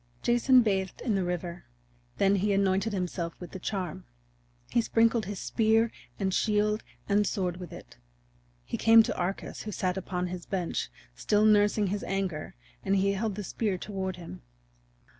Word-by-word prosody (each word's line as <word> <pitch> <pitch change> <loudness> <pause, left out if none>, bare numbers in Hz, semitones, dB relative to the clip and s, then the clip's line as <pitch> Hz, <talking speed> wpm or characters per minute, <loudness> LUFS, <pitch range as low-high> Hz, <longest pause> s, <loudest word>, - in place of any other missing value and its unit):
Jason 240 +1 +5
bathed 190 -3 -1
in 230 - 0
the 195 -2 +1
river; 175 0 -4 0.5
then 200 +1 +3
he 200 +2 +1
anointed 195 +2 +2
himself 180 -3 -3
with 175 - -9
the 190 - -7
charm; 180 -4 -4 0.7
he 235 - +3
sprinkled 225 -1 +2
his 205 -1 -4
spear 225 +3 +2 0.3
and 190 -2 0
shield 210 +1 +1 0.3
and 205 0 +3
sword 180 -4 -1
with 180 -1 -8
it. - - -12 0.7
He - - -3
came 225 0 +7
to - - -3
Arcas 180 +2 -3
who 215 - -5
sat 185 -1 -1
upon 180 -1 -2
his 180 -1 -6
bench, 180 -4 -2 0.2
still 210 - +2
nursing 210 0 +4
his 205 - -3
anger, 190 -5 -3 0.3
and 195 - +2
he 195 +1 +3
held 205 +1 -2
the 210 - -4
spear 200 0 -1
toward 190 -1 -4
him. 170 - -10
195 Hz, 165 wpm, -29 LUFS, 180-215 Hz, 0.7 s, came